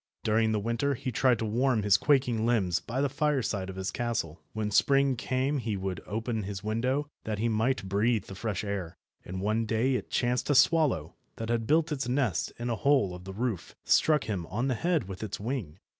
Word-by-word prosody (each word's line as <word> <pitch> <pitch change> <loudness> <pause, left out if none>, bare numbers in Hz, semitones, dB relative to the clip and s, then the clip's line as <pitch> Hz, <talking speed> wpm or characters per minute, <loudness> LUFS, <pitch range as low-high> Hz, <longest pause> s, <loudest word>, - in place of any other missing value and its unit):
During 110 +1 +2
the 110 - +1
winter 115 +6 0
he 130 - -4
tried 125 +1 +3
to 110 - -2
warm 120 +1 +1
his 100 -1 +5
quaking 125 -2 +2
limbs 100 -7 +2
by 120 +10 -3
the 145 - +3
fireside 135 -9 -1
of 95 - -7
his 95 0 -3
castle. 115 -10 -3
When 110 -1 -2
spring 135 +4 +4
came 130 +3 -1
he 110 -4 -2
would 95 -2 -4
open 110 +1 -2
his 100 0 -5
window 125 +7 0 0.2
that 110 -1 -3
he 115 +3 0
might 115 0 0
breathe 105 +3 +1
the - - -9
fresh 105 0 -3
air, 100 -5 -4 0.3
and 95 +1 -5
one 110 +3 0
day 115 +5 +1
it 125 - -2
chanced 125 +2 0
a 145 - +3
swallow, 140 - +3 0.2
that 115 0 -5
had 115 -1 0
built 160 +1 +3
its 135 -4 -2
nest 125 - 0
in 120 - -4
a - - +1
hole 125 -7 +2
of 90 0 -10
the 95 - -7
roof, 115 -6 -3
struck 155 -1 +3
him 95 -7 -3
on 120 +7 -1
the - - +2
head 165 - 0
with 95 -1 -7
its 110 -3 -4
wing. 105 - -4
115 Hz, 215 wpm, -29 LUFS, 100-130 Hz, 0.3 s, his